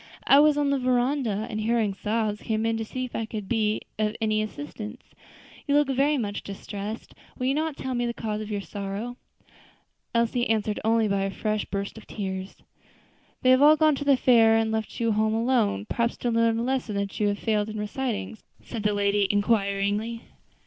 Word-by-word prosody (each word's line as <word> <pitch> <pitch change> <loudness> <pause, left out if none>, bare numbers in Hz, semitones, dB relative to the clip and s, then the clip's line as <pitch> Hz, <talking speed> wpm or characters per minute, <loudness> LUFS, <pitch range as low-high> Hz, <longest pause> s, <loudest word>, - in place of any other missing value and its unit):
"I 275 - +7
was 300 0 +5
on 290 -1 +2
the 280 - +1
veranda, 250 -4 +1
and 215 - -4
hearing 220 -2 +1
sobs, 210 +1 -1
came 220 0 -1
in 225 0 +1
to 225 - -2
see 255 +3 -4
if 250 - -9
I 225 - -2
could 210 -3 -6
be 215 -1 +1 0.2
of 215 0 0
any 215 -1 +1
assistance. 215 +4 -7 0.6
You 285 - +2
look 295 -1 +3
very 280 +3 +2
much 205 -5 -3
distressed; 205 +2 -7 0.2
will 250 - -2
you 265 - +2
not 310 0 -1
tell 260 -1 -3
me 240 -1 0
the 235 - -2
cause 215 -1 -3
of 215 - -6
your 205 -1 -2
sorrow?" 205 +5 -5 1.0
Elsie 235 +1 +1
answered 215 -1 0
only 225 0 +3
by 200 -1 0
a 195 - 0
fresh 215 +1 -2
burst 200 +2 -4
of - - -17
tears. 190 -2 -5 0.9
"They 255 - +6
have 255 +1 +5
all 305 +2 +7
gone 310 0 +4
to 285 - -3
the 280 -2 +4
fair 225 -3 +5
and 225 0 +1
left 220 -1 -3
you 230 -1 +1
at - - +2
home 215 +1 +1
alone; 225 - +1
perhaps 235 - -1
to 240 - -1
learn 230 0 +2
a 230 - -1
lesson 235 -6 -1
you 210 - 0
have 205 0 0
failed 215 -1 0
in 215 - -5
reciting?" 215 -1 -3 0.2
said 230 - -6
the 210 0 +1
lady, 200 0 +2
inquiringly. 205 +2 0
220 Hz, 205 wpm, -26 LUFS, 210-245 Hz, 1.0 s, I